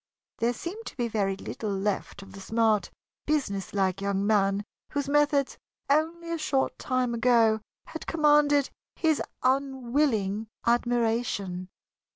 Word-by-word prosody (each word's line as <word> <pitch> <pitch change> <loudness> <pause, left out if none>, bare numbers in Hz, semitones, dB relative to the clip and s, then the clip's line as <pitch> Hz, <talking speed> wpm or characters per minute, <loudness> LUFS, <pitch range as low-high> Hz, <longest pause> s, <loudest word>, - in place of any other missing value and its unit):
There 235 +1 +2
seemed 380 - -7
to - - -9
be 240 -2 0
very 200 -3 0
little 210 +2 -5
left 200 0 -2
of 195 - -14
the 195 - -9
smart, 220 0 +1 0.4
businesslike 195 - 0
young 200 0 0
man 200 -1 +2 0.3
whose 285 -1 -1
methods, 290 -1 +2 0.3
only 335 +3 +1
a 335 - -2
short 275 -3 0
time 255 -2 0
ago, 230 -2 +3 0.2
had 320 - -8
commanded 295 -3 +4 0.2
his 315 -3 +1 0.2
unwilling 255 -5 +1 0.2
admiration. 230 -6 0
235 Hz, 125 wpm, -27 LUFS, 200-285 Hz, 0.4 s, commanded